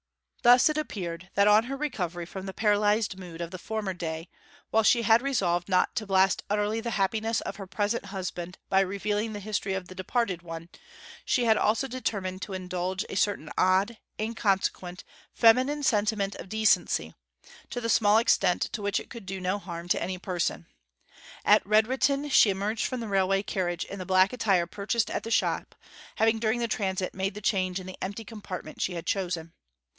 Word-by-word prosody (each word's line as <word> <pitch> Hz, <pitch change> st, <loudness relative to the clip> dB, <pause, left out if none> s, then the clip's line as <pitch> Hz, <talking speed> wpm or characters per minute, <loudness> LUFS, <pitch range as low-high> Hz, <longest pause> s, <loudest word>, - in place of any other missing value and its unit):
Thus 245 Hz, +1 st, +7 dB
it 305 Hz, -, -1 dB
appeared 180 Hz, -, -5 dB
that, 200 Hz, +1 st, +4 dB
on 210 Hz, +2 st, +6 dB
her 275 Hz, +2 st, -4 dB
recovery 180 Hz, -, -3 dB
from 190 Hz, +2 st, -7 dB
the 190 Hz, -, -5 dB
paralysed 210 Hz, -1 st, +2 dB
mood 175 Hz, -2 st, -8 dB
of 170 Hz, 0 st, -4 dB
the 185 Hz, -, -7 dB
former 215 Hz, -1 st, -3 dB
day, 165 Hz, -1 st, -5 dB, 0.4 s
while 225 Hz, -, +4 dB
she 235 Hz, +2 st, +4 dB
had 225 Hz, +2 st, +5 dB
resolved 190 Hz, -10 st, 0 dB
not 185 Hz, -1 st, +2 dB
to 215 Hz, -, -2 dB
blast 190 Hz, -1 st, +3 dB
utterly 210 Hz, +2 st, 0 dB
the 235 Hz, -, -3 dB
happiness 220 Hz, +3 st, 0 dB
of -, -, -6 dB
her 195 Hz, -2 st, -8 dB
present 205 Hz, +3 st, -1 dB
husband 185 Hz, -2 st, -5 dB
by 190 Hz, -, +3 dB
revealing 205 Hz, +3 st, -1 dB
the 205 Hz, -, -5 dB
history 200 Hz, -1 st, -2 dB
of 190 Hz, -1 st, -5 dB
the 185 Hz, -, -10 dB
departed 185 Hz, -1 st, -1 dB
one, 165 Hz, 0 st, -8 dB, 0.5 s
she 245 Hz, -, +1 dB
had 220 Hz, -1 st, +4 dB
also 225 Hz, +6 st, +1 dB
determined 200 Hz, -7 st, -3 dB
to 200 Hz, -, -5 dB
indulge 185 Hz, +1 st, -3 dB
a -, -, -6 dB
certain 190 Hz, -5 st, 0 dB
odd, 195 Hz, +5 st, +2 dB, 0.2 s
inconsequent, 195 Hz, -5 st, -1 dB, 0.3 s
feminine 255 Hz, +6 st, +4 dB
sentiment 210 Hz, -4 st, +1 dB
of -, -, -9 dB
decency, 220 Hz, 0 st, +2 dB, 0.6 s
to 245 Hz, -, -4 dB
the 230 Hz, -, -3 dB
small 215 Hz, -2 st, +4 dB
extent 225 Hz, -5 st, +3 dB
to 225 Hz, -, -4 dB
which 200 Hz, 0 st, 0 dB
it -, -, -12 dB
could 230 Hz, -6 st, -9 dB
do 190 Hz, 0 st, -4 dB
no 185 Hz, +2 st, -1 dB
harm 170 Hz, -3 st, -7 dB
to -, -, +1 dB
any 185 Hz, +1 st, -2 dB
person. 180 Hz, -2 st, -2 dB, 0.8 s
At -, -, +6 dB
Redrutin 260 Hz, +7 st, +2 dB
she 225 Hz, -, +6 dB
emerged 200 Hz, +3 st, -1 dB
from 255 Hz, -2 st, -4 dB
the 225 Hz, -, -4 dB
railway 195 Hz, 0 st, +2 dB
carnage 180 Hz, -4 st, -2 dB
in 200 Hz, -, -8 dB
the 185 Hz, -, -6 dB
black 185 Hz, +2 st, +4 dB
attire 195 Hz, -8 st, +2 dB
purchased 205 Hz, +5 st, -1 dB
at -, -, -2 dB
the 225 Hz, -, -7 dB
shop, -, -, 0 dB, 0.4 s
having 225 Hz, 0 st, +2 dB
during 220 Hz, +1 st, +1 dB
the 235 Hz, -, 0 dB
transit 190 Hz, -4 st, -2 dB
made 190 Hz, +1 st, -2 dB
the 210 Hz, -, -7 dB
change 190 Hz, -3 st, 0 dB
in 185 Hz, -, -9 dB
the 185 Hz, -, -10 dB
empty 200 Hz, +4 st, -4 dB
compartment 195 Hz, -7 st, -7 dB
she 180 Hz, -, -1 dB
had 170 Hz, 0 st, -5 dB
chosen. 175 Hz, -4 st, -2 dB
200 Hz, 190 wpm, -28 LUFS, 185-220 Hz, 0.8 s, Thus